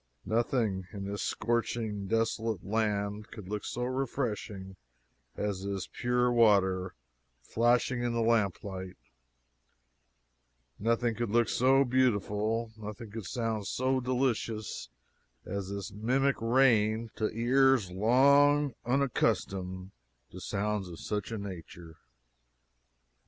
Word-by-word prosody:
Nothing, 110 Hz, -5 st, 0 dB
in 100 Hz, -1 st, -5 dB
this 100 Hz, +1 st, -4 dB
scorching, 115 Hz, -3 st, -1 dB
desolate 115 Hz, -2 st, -1 dB
land 105 Hz, 0 st, -1 dB
could 105 Hz, -5 st, -10 dB
look 105 Hz, +1 st, -4 dB
so 125 Hz, -, -3 dB
refreshing 120 Hz, -7 st, -3 dB, 0.6 s
as 100 Hz, -2 st, -2 dB
this 100 Hz, -2 st, -3 dB
pure 125 Hz, 0 st, 0 dB
water 95 Hz, -6 st, +3 dB, 0.5 s
flashing 120 Hz, -, +2 dB
in 120 Hz, 0 st, 0 dB
the 115 Hz, -1 st, 0 dB
lamp 110 Hz, -5 st, +2 dB
light; 95 Hz, -2 st, -6 dB, 1.8 s
nothing 115 Hz, +2 st, +1 dB
could 115 Hz, 0 st, -3 dB
look 120 Hz, +1 st, +3 dB
so 135 Hz, +4 st, +4 dB
beautiful, 115 Hz, -2 st, +1 dB
nothing 105 Hz, +1 st, -8 dB
could 110 Hz, -4 st, -6 dB
sound 110 Hz, -3 st, -2 dB
so 130 Hz, +4 st, 0 dB
delicious 125 Hz, -4 st, -2 dB, 0.6 s
as 100 Hz, -1 st, -4 dB
this 100 Hz, 0 st, -5 dB
mimic 130 Hz, +6 st, +1 dB
rain 115 Hz, -2 st, +3 dB
to 110 Hz, -, 0 dB
ears 125 Hz, -3 st, +3 dB
long 140 Hz, +7 st, +4 dB
unaccustomed 95 Hz, -8 st, 0 dB, 0.4 s
to 90 Hz, -, -9 dB
sounds 105 Hz, 0 st, -2 dB
of 85 Hz, -2 st, -9 dB
such 105 Hz, +1 st, -3 dB
a 115 Hz, -, -3 dB
nature. 85 Hz, -4 st, -9 dB
110 Hz, 110 wpm, -30 LUFS, 100-120 Hz, 1.8 s, so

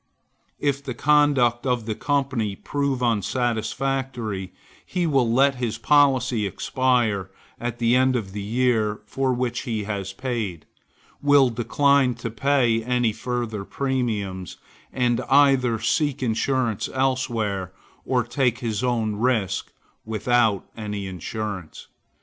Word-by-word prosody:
If 140 Hz, -1 st, 0 dB
the 130 Hz, -3 st, -5 dB
conduct 135 Hz, -4 st, +3 dB
of 125 Hz, -3 st, 0 dB
the 110 Hz, -, -2 dB
company 130 Hz, -6 st, -1 dB
prove 140 Hz, +1 st, -2 dB
unsatisfactory, 120 Hz, -1 st, -1 dB, 0.3 s
he 180 Hz, -1 st, -2 dB
will 135 Hz, -7 st, +2 dB
let 135 Hz, +3 st, +4 dB
his 120 Hz, -3 st, -2 dB
policy 130 Hz, -7 st, +3 dB
expire 115 Hz, -3 st, 0 dB, 0.3 s
at 120 Hz, 0 st, -3 dB
the 120 Hz, 0 st, +3 dB
end 130 Hz, 0 st, +3 dB
of 105 Hz, -6 st, -3 dB
the 100 Hz, +1 st, -5 dB
year 110 Hz, -1 st, 0 dB
for 135 Hz, +3 st, -1 dB
which 125 Hz, -1 st, -1 dB
he 110 Hz, -3 st, -3 dB
has 100 Hz, -2 st, -4 dB
paid; 110 Hz, -7 st, -4 dB, 0.6 s
will 145 Hz, -3 st, +5 dB
decline 130 Hz, +2 st, +2 dB
to 115 Hz, -1 st, -5 dB
pay 120 Hz, -1 st, +2 dB
any 125 Hz, -2 st, +1 dB
further 115 Hz, -2 st, -3 dB
premiums, 105 Hz, -8 st, -3 dB, 0.3 s
and 125 Hz, -1 st, +1 dB
either 135 Hz, -4 st, +4 dB
seek 145 Hz, +2 st, 0 dB
insurance 120 Hz, -1 st, 0 dB
elsewhere, 115 Hz, -8 st, -1 dB, 0.3 s
or 125 Hz, -2 st, +1 dB
take 120 Hz, 0 st, 0 dB
his 115 Hz, -1 st, -3 dB
own 115 Hz, -4 st, 0 dB
risk 110 Hz, -5 st, 0 dB, 0.3 s
without 110 Hz, -1 st, +1 dB
any 105 Hz, -2 st, -4 dB
insurance. 95 Hz, 0 st, -6 dB
120 Hz, 120 wpm, -24 LUFS, 110-130 Hz, 0.6 s, will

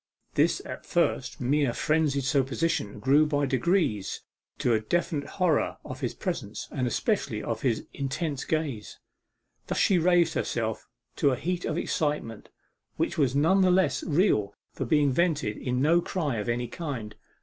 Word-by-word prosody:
This -, -, +2 dB
at -, -, -7 dB
first -, -, 0 dB
mere 140 Hz, 0 st, +1 dB
frenzied 150 Hz, -3 st, +1 dB
supposition 135 Hz, -4 st, 0 dB
grew 140 Hz, +6 st, +4 dB
by 145 Hz, -1 st, +1 dB
degrees 130 Hz, -, 0 dB, 0.4 s
to 120 Hz, -, +1 dB
a 110 Hz, -, +3 dB
definite 145 Hz, +3 st, -1 dB
horror 180 Hz, -6 st, +2 dB
of 130 Hz, -, -7 dB
his 125 Hz, -5 st, -3 dB
presence, 135 Hz, -, -4 dB
and 130 Hz, -3 st, -1 dB
especially 120 Hz, -, -1 dB
of 115 Hz, -1 st, -3 dB
his 120 Hz, -5 st, 0 dB
intense 140 Hz, +1 st, -3 dB
gaze. 145 Hz, -9 st, -3 dB, 0.7 s
Thus -, -, -2 dB
she 190 Hz, -3 st, +4 dB
raised 175 Hz, -1 st, +3 dB
herself 110 Hz, -2 st, -2 dB, 0.3 s
to 140 Hz, -, +3 dB
a 130 Hz, -, +1 dB
heat 175 Hz, +7 st, -3 dB
of -, -, -2 dB
excitement, 145 Hz, -8 st, -2 dB, 0.5 s
which -, -, -1 dB
was 135 Hz, -3 st, +2 dB
none 165 Hz, +7 st, +4 dB
the 185 Hz, -, +5 dB
less 180 Hz, -5 st, +2 dB
real 145 Hz, -, +2 dB, 0.2 s
for 135 Hz, -, -3 dB
being 145 Hz, +1 st, +3 dB
vented 150 Hz, -7 st, +1 dB
in 125 Hz, +1 st, -1 dB
no 170 Hz, +3 st, +4 dB
cry 155 Hz, -, -2 dB
of 105 Hz, +2 st, -3 dB
any 120 Hz, +1 st, -1 dB
kind. 120 Hz, -7 st, -5 dB
140 Hz, 160 wpm, -27 LUFS, 120-165 Hz, 0.7 s, the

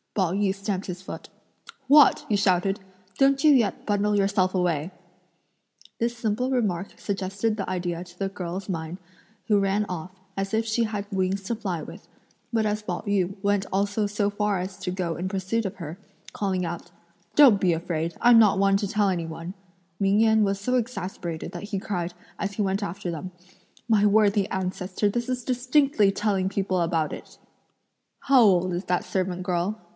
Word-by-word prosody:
Pao 185 Hz, -4 st, +1 dB
yü 195 Hz, -1 st, +1 dB
stamped 195 Hz, -1 st, -3 dB
his 180 Hz, -1 st, -5 dB
foot. 190 Hz, -, -8 dB, 0.6 s
"What!" 290 Hz, 0 st, +6 dB
he 210 Hz, -, +1 dB
shouted, 195 Hz, 0 st, +2 dB, 0.4 s
"don't 275 Hz, +1 st, +3 dB
you 305 Hz, -, +7 dB
yet 240 Hz, -7 st, +2 dB
bundle 205 Hz, 0 st, +1 dB
yourself 195 Hz, -2 st, +2 dB
away!" 175 Hz, -3 st, 0 dB, 1.1 s
This 235 Hz, +1 st, -1 dB
simple 235 Hz, +2 st, -1 dB
remark 200 Hz, -8 st, -1 dB
suggested 200 Hz, +2 st, -2 dB
the 200 Hz, -3 st, -4 dB
idea 175 Hz, -2 st, -2 dB
to 175 Hz, 0 st, -17 dB
the 195 Hz, -, 0 dB
girl's 185 Hz, -1 st, -5 dB
mind 165 Hz, -2 st, -4 dB, 0.5 s
who 210 Hz, -3 st, +4 dB
ran 200 Hz, +1 st, +1 dB
off, 180 Hz, 0 st, -5 dB, 0.2 s
as 195 Hz, +1 st, -3 dB
if 220 Hz, +1 st, +1 dB
she 225 Hz, +1 st, +1 dB
had 210 Hz, -2 st, -3 dB
wings 190 Hz, 0 st, 0 dB
to 230 Hz, +5 st, -2 dB
fly 190 Hz, -7 st, -3 dB
with; -, -, -11 dB, 0.4 s
but 225 Hz, -2 st, +1 dB
as 210 Hz, 0 st, 0 dB
Pao 180 Hz, -4 st, -4 dB
yü 195 Hz, -2 st, +1 dB
went 200 Hz, -1 st, +1 dB
also 200 Hz, +2 st, 0 dB
so 205 Hz, 0 st, 0 dB
far 205 Hz, -1 st, 0 dB
as 185 Hz, +1 st, -5 dB
to 180 Hz, -, -3 dB
go 180 Hz, -3 st, -2 dB
in 180 Hz, +2 st, -3 dB
pursuit 195 Hz, +4 st, -1 dB
of 195 Hz, -, -3 dB
her, 170 Hz, -1 st, -7 dB, 0.4 s
calling 190 Hz, -3 st, -1 dB
out: 170 Hz, 0 st, -6 dB, 0.5 s
"Don't 255 Hz, -9 st, +7 dB
be 185 Hz, -, +3 dB
afraid, 165 Hz, 0 st, -2 dB
I'm 240 Hz, -1 st, +7 dB
not 205 Hz, -3 st, +5 dB
one 195 Hz, 0 st, +4 dB
to 200 Hz, 0 st, -2 dB
tell 205 Hz, +1 st, +1 dB
anyone," 170 Hz, -1 st, -3 dB, 0.5 s
Ming 200 Hz, +1 st, +3 dB
Yen 220 Hz, -1 st, +4 dB
was 200 Hz, -1 st, 0 dB
so 250 Hz, +5 st, 0 dB
exasperated 190 Hz, -9 st, -3 dB
that -, -, -6 dB
he 200 Hz, -4 st, -2 dB
cried, 180 Hz, -4 st, -3 dB, 0.3 s
as 200 Hz, 0 st, -2 dB
he 210 Hz, -, -1 dB
went 195 Hz, +1 st, -1 dB
after 185 Hz, -1 st, -4 dB
them, 170 Hz, +3 st, -6 dB, 0.6 s
"My 215 Hz, -3 st, +4 dB
worthy 205 Hz, -1 st, +3 dB
ancestor, 190 Hz, +2 st, -1 dB
this 240 Hz, +4 st, -2 dB
is 250 Hz, -1 st, -2 dB
distinctly 255 Hz, -4 st, +3 dB
telling 195 Hz, -2 st, 0 dB
people 190 Hz, -2 st, -1 dB
about 165 Hz, -2 st, 0 dB
it." -, -, -10 dB, 0.8 s
"How 270 Hz, -2 st, +5 dB
old 185 Hz, -4 st, +4 dB
is 175 Hz, +3 st, -3 dB
that 180 Hz, 0 st, 0 dB
servant 185 Hz, -1 st, -2 dB
girl?" 180 Hz, +4 st, -1 dB
195 Hz, 180 wpm, -25 LUFS, 180-210 Hz, 1.1 s, you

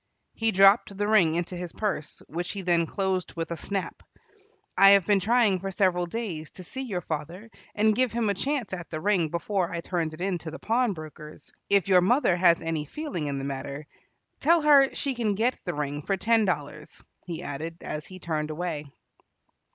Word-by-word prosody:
He 225 Hz, 0 st, 0 dB
dropped 195 Hz, +1 st, +5 dB
the 205 Hz, 0 st, 0 dB
ring 185 Hz, -7 st, +4 dB
into 175 Hz, +1 st, -2 dB
his 175 Hz, -1 st, -5 dB
purse, 200 Hz, -8 st, -3 dB
which 175 Hz, +3 st, -4 dB
he 200 Hz, -2 st, -5 dB
then 170 Hz, -2 st, +2 dB
closed 190 Hz, -1 st, -2 dB
with 165 Hz, 0 st, -4 dB
a -, -, -1 dB
snap. 195 Hz, +3 st, -4 dB, 0.7 s
"I 195 Hz, +1 st, +8 dB
have 200 Hz, -3 st, +5 dB
been 205 Hz, +1 st, +3 dB
trying 215 Hz, -1 st, +3 dB
for 195 Hz, +2 st, -4 dB
several 185 Hz, -2 st, +1 dB
days 175 Hz, -7 st, -4 dB
to 185 Hz, -, -9 dB
see 260 Hz, +9 st, -6 dB
your 205 Hz, -9 st, -3 dB
father 170 Hz, +8 st, -6 dB, 0.2 s
and 215 Hz, 0 st, +3 dB
give 255 Hz, 0 st, +2 dB
him 230 Hz, -1 st, 0 dB
a 200 Hz, -, +2 dB
chance 265 Hz, 0 st, -2 dB
at 175 Hz, -2 st, -6 dB
the 155 Hz, -, -4 dB
ring 185 Hz, -3 st, +1 dB
before 175 Hz, +2 st, -1 dB
I 170 Hz, -, -3 dB
turned 165 Hz, -3 st, -2 dB
it -, -, -17 dB
in 185 Hz, -2 st, -1 dB
to 160 Hz, -, -7 dB
the 160 Hz, -, -7 dB
pawnbroker's. 155 Hz, -11 st, -3 dB, 0.2 s
If 200 Hz, -2 st, +3 dB
your 185 Hz, -2 st, +5 dB
mother 240 Hz, 0 st, +3 dB
has 175 Hz, -2 st, +4 dB
any 165 Hz, -2 st, -2 dB
feeling 225 Hz, -, -4 dB
in 140 Hz, -1 st, -2 dB
the 135 Hz, -, -4 dB
matter, 140 Hz, +2 st, -5 dB, 0.5 s
tell 330 Hz, +2 st, +4 dB
her 280 Hz, -3 st, +6 dB
she 280 Hz, -2 st, -1 dB
can 225 Hz, -5 st, -1 dB
get 235 Hz, +5 st, 0 dB
the 175 Hz, -, -3 dB
ring 145 Hz, 0 st, -3 dB
for 195 Hz, +6 st, -1 dB
ten 220 Hz, +3 st, +3 dB
dollars," 150 Hz, -4 st, -4 dB, 0.2 s
he 170 Hz, -2 st, -5 dB
added 160 Hz, +4 st, -5 dB
as 150 Hz, 0 st, -5 dB
he 185 Hz, -, -10 dB
turned 155 Hz, -4 st, -3 dB
away. 155 Hz, -3 st, -4 dB
180 Hz, 200 wpm, -26 LUFS, 160-210 Hz, 0.7 s, I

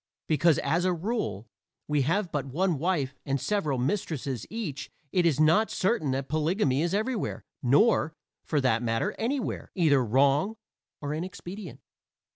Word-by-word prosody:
Because, 160 Hz, 0 st, +4 dB
as 165 Hz, +5 st, +1 dB
a 185 Hz, 0 st, +2 dB
rule, 180 Hz, -, -2 dB, 0.4 s
we 150 Hz, -1 st, +2 dB
have 170 Hz, +6 st, 0 dB
but 140 Hz, -2 st, -2 dB
one 165 Hz, +3 st, 0 dB
wife 155 Hz, -5 st, 0 dB
and 140 Hz, 0 st, -1 dB
several 155 Hz, -6 st, 0 dB
mistresses 135 Hz, -, -2 dB
each 205 Hz, -11 st, -5 dB, 0.2 s
it 175 Hz, -2 st, +3 dB
is 150 Hz, -3 st, +1 dB
not 165 Hz, +8 st, +4 dB
certain 190 Hz, -, 0 dB
that 135 Hz, +1 st, -1 dB
polygamy 155 Hz, -2 st, +1 dB
is 175 Hz, +3 st, 0 dB
everywhere 220 Hz, +1 st, -2 dB, 0.2 s
nor, 150 Hz, -, +3 dB, 0.3 s
for 150 Hz, -, 0 dB
that 120 Hz, -3 st, +2 dB
matter, 120 Hz, -, 0 dB
anywhere 255 Hz, +3 st, -2 dB
either 150 Hz, -8 st, +4 dB
wrong 140 Hz, -, +3 dB, 0.5 s
or 145 Hz, 0 st, -3 dB
inexpedient. 180 Hz, -, -7 dB
155 Hz, 145 wpm, -28 LUFS, 140-190 Hz, 0.5 s, Because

